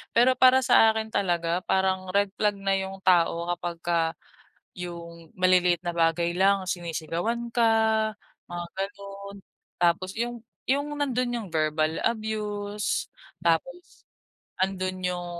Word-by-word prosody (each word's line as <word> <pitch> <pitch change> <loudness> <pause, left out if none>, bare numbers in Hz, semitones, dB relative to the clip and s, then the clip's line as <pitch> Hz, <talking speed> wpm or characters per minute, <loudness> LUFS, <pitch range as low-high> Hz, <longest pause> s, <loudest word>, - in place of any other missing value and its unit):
Pero 255 +2 +5
para 260 0 +6
sa 225 -2 +5
akin 220 0 -3
talaga 175 -3 0
parang 190 0 +1
red 200 0 +3
flag 210 -1 +1
na 195 0 +1
yung 190 0 -5
tao 170 -1 +3
kapag 175 0 -5
ka 170 -1 +1 0.8
yung 170 -2 -8
maliliit 180 -2 +3
na 175 - -1
bagay 170 0 +1
lang 195 +2 +3
sinisigawan 175 +6 -3
ka, 235 -1 +3 0.8
mga 175 0 -5
ganun, 200 0 -6 0.4
tapos 175 +2 +1
yung 240 +1 -2 0.3
yung 280 +2 +2 0.2
nandun 250 -3 0
yung 230 -4 -4
verbal 155 0 0
abuse, 210 -2 -2 0.3
tapos 220 - -1 0.6
andun 185 -1 -1
yung 180 -1 -3
190 Hz, 125 wpm, -26 LUFS, 175-215 Hz, 0.8 s, para